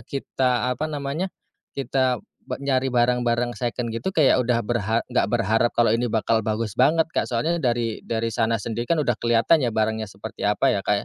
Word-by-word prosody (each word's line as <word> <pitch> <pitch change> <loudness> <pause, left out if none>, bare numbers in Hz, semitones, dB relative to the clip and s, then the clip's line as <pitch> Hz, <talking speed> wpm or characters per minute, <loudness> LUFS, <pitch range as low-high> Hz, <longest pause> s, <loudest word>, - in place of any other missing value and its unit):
kita 125 -2 0
apa 150 +5 -3
namanya, 145 +4 -3 0.5
kita 130 -1 0 0.2
nyari 130 0 -1
barang-barang 120 0 +1
second 120 0 -3
gitu 150 +12 -2
kayak 155 -7 +4
udah 120 -1 +1
berha 115 -1 0
enggak - - +1
berharap 110 +4 +2
kalo 115 -2 +4
ini 120 0 0
bakal 110 0 +1
bagus 110 -1 -2
banget 160 +6 +3
Kak, - - +1
soalnya 125 +9 0
dari 120 -3 0
dari 115 0 -2
sana 115 0 +1
sendiri 115 0 -3
kan 170 - +3
udah 120 -4 +1
kelihatan 120 +6 +3
ya 120 - +1
barangnya 110 -1 -1
seperti 100 +1 -9
apa 105 +6 +2
ya 100 - -2
Kak 105 - +1
120 Hz, 180 wpm, -23 LUFS, 115-130 Hz, 0.5 s, kayak